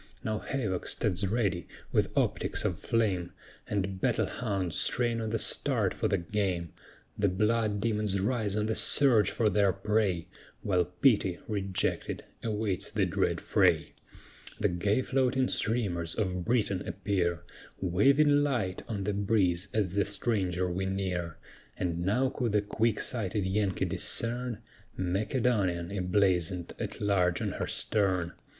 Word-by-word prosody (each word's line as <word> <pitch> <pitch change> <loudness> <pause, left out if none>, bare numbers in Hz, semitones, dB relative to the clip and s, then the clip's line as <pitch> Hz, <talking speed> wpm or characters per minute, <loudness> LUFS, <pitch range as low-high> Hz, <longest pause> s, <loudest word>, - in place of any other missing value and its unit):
Now 110 -1 -1
havoc 110 -10 -3
stands 100 -3 0
ready, 95 -5 0 0.2
with - - +2
optics - - 0
of - - -1
flame, 100 -7 0 0.3
And 100 -2 -2
battle - - +2
hounds 95 -8 -2
"strain 120 -1 +1
on 110 - -2
the 115 - 0
start" - - +1
for - - -1
the - - +1
game; 90 -2 -2 0.5
The 100 - +3
blood 105 +2 +1
demons 105 -3 0
rise 105 -1 0
on 105 0 0
the 110 - 0
surge 120 -4 +4
for 115 - +1
their 100 -1 +3
prey, 100 -3 0 0.4
While 90 -3 +2
Pity, 95 -1 +2
rejected, 100 -3 -2 0.2
awaits 105 -4 -1
the - - +1
dread - - 0
fray. - - +2 0.7
The - - +2
gay 100 +8 +1
floating 130 0 +1
streamers 95 -8 0
of 90 -4 -2
Britain 105 -6 +1
appear, 90 -2 -1 0.4
Waving 140 - +4
light 120 -11 -1
on 105 -4 -3
the 105 +1 -1
breeze 100 -3 +1
as 100 -5 0
the 100 0 +2
stranger 95 -4 -1
we 95 +2 -2
near; 90 -4 -2 0.4
And 85 -1 -2
now 125 +8 +2
could 120 -4 -2
the 105 -1 +3
quick 110 +1 0
sighted 105 -4 -2
Yankee 95 0 0
discern 120 0 -1 0.3
"Macedonian," 95 -2 0
emblazoned 90 -2 +1
at - - -5
large 90 -4 +2
on - - -2
her - - -3
stern. 95 -5 0
100 Hz, 140 wpm, -29 LUFS, 90-110 Hz, 0.7 s, surge